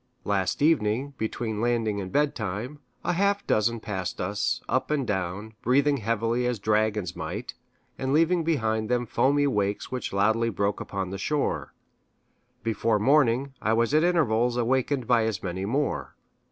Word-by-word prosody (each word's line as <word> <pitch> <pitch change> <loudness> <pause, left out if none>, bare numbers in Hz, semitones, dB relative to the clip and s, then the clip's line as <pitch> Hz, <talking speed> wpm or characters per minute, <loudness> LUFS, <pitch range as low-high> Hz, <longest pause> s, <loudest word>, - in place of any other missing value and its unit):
Last 100 +5 0
evening, 135 -3 +2
between 110 -1 -2
landing 115 -4 0
and 95 -1 -6
bedtime, 125 -2 -1 0.2
a - - 0
half 200 +3 +1
dozen 115 +2 +1
passed 95 -4 -4
us, 100 +3 -1
up - - 0
and 145 -3 0
down, 100 +2 -3
breathing 140 +4 +3
heavily 115 +2 0
as 125 -1 -1
dragons 105 -3 0
might, - - -5 0.5
and 130 0 -1
leaving 165 +3 +3
behind 110 -9 0
them 120 0 +1
foamy 145 +5 +2
wakes 105 -6 -1
which 130 -1 -3
loudly 110 +4 +2
broke 100 -1 -1
upon 95 -2 -4
the 100 - -5
shore. 150 +7 -1 0.9
Before 115 0 +1
morning, 135 +2 +3
I 110 - +1
was 115 +4 +1
at 155 +1 +4
intervals 125 -9 +2
awakened 130 +2 +1
by 120 -2 +3
as 110 -4 -2
many 95 +1 -3
more. 135 +7 -1
115 Hz, 155 wpm, -26 LUFS, 105-135 Hz, 0.9 s, at